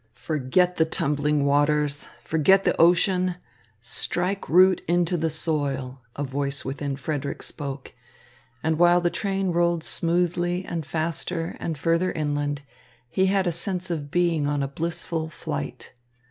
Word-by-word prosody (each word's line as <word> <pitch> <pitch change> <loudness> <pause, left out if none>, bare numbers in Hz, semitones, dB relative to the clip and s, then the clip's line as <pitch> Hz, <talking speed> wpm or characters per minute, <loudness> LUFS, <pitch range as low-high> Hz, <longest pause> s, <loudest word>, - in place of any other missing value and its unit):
"Forget 160 +5 +1
the 160 - +4
tumbling 150 -1 0
waters, 145 0 +2 0.2
forget 190 +5 +4
the - - +2
ocean, 180 +1 +3 0.5
strike 175 - -2
root 185 +2 +5
into 175 +1 +2
the 160 -1 0
soil," 140 -5 -2
a 145 - -3
voice 140 +1 -2
within 140 +1 -3
Frederick 140 0 -4
spoke; 140 -3 -5 0.7
and 160 0 0
while 175 0 +6
the 175 -1 0
train 195 -2 -1
rolled 170 -1 +1
smoothly 175 +2 +1
and 165 -4 -4
faster 165 +1 -2
and 160 -2 -3
further 170 +4 +1
inland, 145 -2 -2 0.5
he 190 +6 +2
had 195 0 +2
a 175 - +1
sense 180 +1 -1
of 150 -4 -3
being 170 -3 +1
on 145 -1 0
a - - -1
blissful 160 +2 -3
flight. - - -6
160 Hz, 140 wpm, -25 LUFS, 145-175 Hz, 0.7 s, while